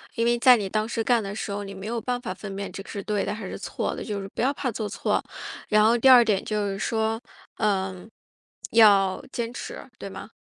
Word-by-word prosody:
因 230 - +1
为 240 0 +2
在 250 +1 +8
你 205 -4 -2
当 215 +2 0
时 230 -1 -2
干 240 0 +3
的 200 -1 -5
时 215 - -4
候， 205 0 -4
你 195 - -8
没 190 +1 -8
有 235 +1 -2
办 245 +1 -2
法 230 -7 -4
分 195 +1 -8
辨 200 0 -5
这 - - -7
个 - - -14
是 200 -2 -5
对 210 -1 -1
的 200 - -2
还 220 -2 -7
是 - - -6
错 - - -3
的， - - -6
就 205 -2 -4
是 195 - -7
不 - - -3
要 265 +4 +2
怕 265 -3 -2
做 215 -1 -3
错。 - - 0 0.5
然 215 0 +4
后 230 +2 +5
第 240 - +3
二 255 -2 +9
点 210 -4 +1
就 210 -1 -1
是 195 0 -4
说， 220 0 0 0.4
呃， 190 -3 -1 0.6
要 200 -4 +5
坚 235 -1 -3
持， - - -7 0.2
对 - - -6
吗？ 195 +2 -9
215 Hz, 270 characters per minute, -25 LUFS, 195-230 Hz, 0.6 s, 二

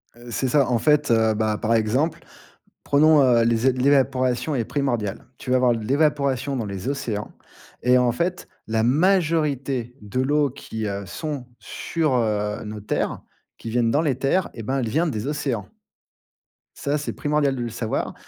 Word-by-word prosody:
Heu, 120 0 -12
c'est 130 - -1
ça, 140 +1 +3
en 120 -2 +2
fait, 150 -1 +3
heu, 110 -1 +3
bah, 110 0 0
par 115 +2 +1
exemple, 120 +9 +1 0.7
prenons, 150 +1 +5
heu, 120 -3 +4
les 115 +1 +1
é 130 - +5
l'évaporation 130 +1 +2
est 120 -3 0
primordiale. 120 -9 -2
Tu - - -6
vas 130 - +4
avoir 125 -2 +3
de 110 -2 -5
l'évaporation 140 0 +1
dans 115 - -2
les 100 +3 -5
océans 115 -7 -3 0.5
et, 125 0 +5
en 125 -1 +2
fait, 175 +7 -2 0.2
la 110 0 0
majorité 140 -5 +1
de 105 +5 -2
l'eau 145 +1 +2
qui, 110 -4 -6
heu, 100 -1 -4
sont 140 - -5
sur, 155 -5 -2
heu, 105 -3 -1
nos 105 0 -6
terres, 105 - -2 0.4
qui 115 - -7
viennent 120 -1 +2
dans 150 +5 +2
les 140 -6 0
terres, 170 +8 +1
eh 115 - -7
ben 135 +5 -1
elle 120 -4 -1
vient 160 +10 +1
des 110 -3 -3
océans. 140 -8 -2 1.1
Ça, 145 +1 -1
c'est 150 - -4
primordial 145 -2 0
de 125 - -4
le 120 - -2
savoir 115 0 -3
125 Hz, 180 wpm, -23 LUFS, 115-145 Hz, 1.1 s, prenons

